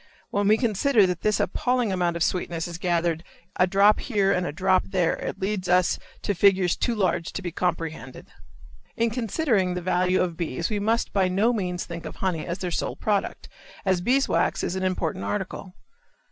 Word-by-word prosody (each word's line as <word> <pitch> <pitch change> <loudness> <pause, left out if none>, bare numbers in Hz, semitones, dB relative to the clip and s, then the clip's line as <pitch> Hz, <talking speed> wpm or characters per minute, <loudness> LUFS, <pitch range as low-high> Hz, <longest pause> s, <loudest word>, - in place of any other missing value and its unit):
When 205 0 +1
we 215 +1 +5
consider 225 0 +3
that 180 -2 -2
this 210 -1 +1
appalling 245 -4 0
amount 175 -2 0
of 170 - 0
sweetness 170 -2 -1
is 170 -1 -7
gathered 170 -2 0 0.3
a 185 - +4
drop 200 +3 +4
here 205 -6 +1
and 180 0 0
a - - -3
drop 185 +3 +2
there 180 -4 +1
it 195 - -5
leads 190 -2 -2
us 180 0 +3 0.2
to 205 - 0
figures 190 -2 +3
too 240 - -1
large 175 -5 0
to - - -4
be 175 - -3
comprehended. 165 -2 -3 0.7
In 230 -1 +1
considering 225 - 0
the - - -1
value 180 +1 +2
of 175 -3 -1
bees 170 - -2
we 210 - 0
must 225 +3 0
by 195 -2 +3
no 200 +6 +2
means 180 -5 -2
think 170 -1 -7
of - - -9
honey 180 -5 -2
as 170 - -3
their 180 -2 -4
sole - - -2
product, 205 -2 -2 0.4
as 185 -2 +2
beeswax 260 +8 +1
is 180 - -2
an 190 - -2
important 180 - -1
article. 185 - -4
185 Hz, 190 wpm, -25 LUFS, 175-205 Hz, 0.7 s, we